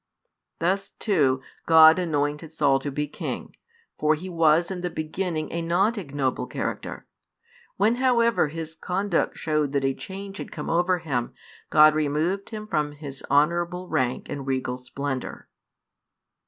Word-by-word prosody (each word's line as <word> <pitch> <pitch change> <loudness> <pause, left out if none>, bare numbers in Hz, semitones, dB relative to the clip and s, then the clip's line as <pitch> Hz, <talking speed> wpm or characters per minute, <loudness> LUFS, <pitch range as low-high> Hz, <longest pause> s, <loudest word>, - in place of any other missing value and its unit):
Thus, 195 +3 0
too, 140 - +1 0.2
God 160 +1 +8
anointed 150 -2 -1
Saul 140 -4 +2
to 145 - -4
be 150 +2 -2
king: - - -6 0.4
for 155 +1 +3
he 180 +5 -7
was 165 0 +3
in 180 -2 -4
the 180 - -2
beginning 155 0 -3
a 170 - -2
not 185 +7 +2
ignoble 140 - -2
character; - - -4 0.7
when 230 +3 +3
however 235 -7 +3
his 160 +1 -6
conduct 185 +2 -1
showed 150 -3 0
that 140 -1 +1
a 135 - +2
change 195 +5 -8
had - - -7
come - - -4
over 175 +2 +2
him, 135 -8 -3 0.3
God 155 0 +7
removed 155 +6 0
him 215 -1 -6
from 150 -8 -1
his 145 -2 -8
honourable 170 +5 +1
rank 130 0 0
and 140 -2 -6
regal 130 -1 -1
splendour. 130 +1 -5
160 Hz, 145 wpm, -25 LUFS, 145-180 Hz, 0.7 s, God